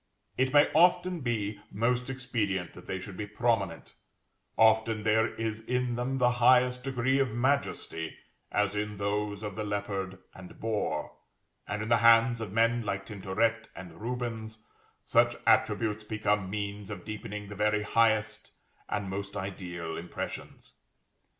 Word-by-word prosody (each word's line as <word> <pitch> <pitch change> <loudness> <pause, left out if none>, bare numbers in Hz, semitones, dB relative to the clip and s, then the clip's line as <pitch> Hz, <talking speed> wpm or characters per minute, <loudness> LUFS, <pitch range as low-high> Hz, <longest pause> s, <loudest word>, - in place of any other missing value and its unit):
It 130 0 +1
may 145 0 +6
often 175 +2 +4
be 110 -4 -2
most 120 +4 0
expedient 110 -9 -2
that - - -13
they 95 - -2
should 95 +1 -8
be 105 +2 -5
prominent; 105 -5 -1 0.6
often 110 -1 +4
there 110 +1 +2
is 110 -1 -3
in 125 +1 -1
them 125 +2 -1
the 125 -1 +4
highest 125 0 +5
degree 130 0 +1
of 130 -5 0
majesty, 120 - -1 0.3
as 105 -1 +1
in 105 0 -3
those 105 +1 -2
of 105 -2 -5
the 110 - -3
leopard 100 -2 -3 0.2
and 95 -2 -12
boar; 110 -2 -2 0.6
and 105 +1 -2
in 110 - -5
the 115 - +5
hands 115 +1 +5
of 110 -4 -5
men 115 +2 +3
like 100 -3 -3
Tintoret 110 +2 -1
and 85 -2 -10
Rubens, 115 -2 -4 0.4
such - - +4
attributes 105 0 +2
become 105 -2 0
means 100 0 -4
of 95 -4 -7
deepening 105 -1 -6
the - - -6
very 105 +1 +1
highest 110 -1 +1 0.4
and 105 -1 -2
most 100 +1 -5
ideal 90 -4 -5
impressions. 85 +1 -7
110 Hz, 145 wpm, -29 LUFS, 100-120 Hz, 0.6 s, may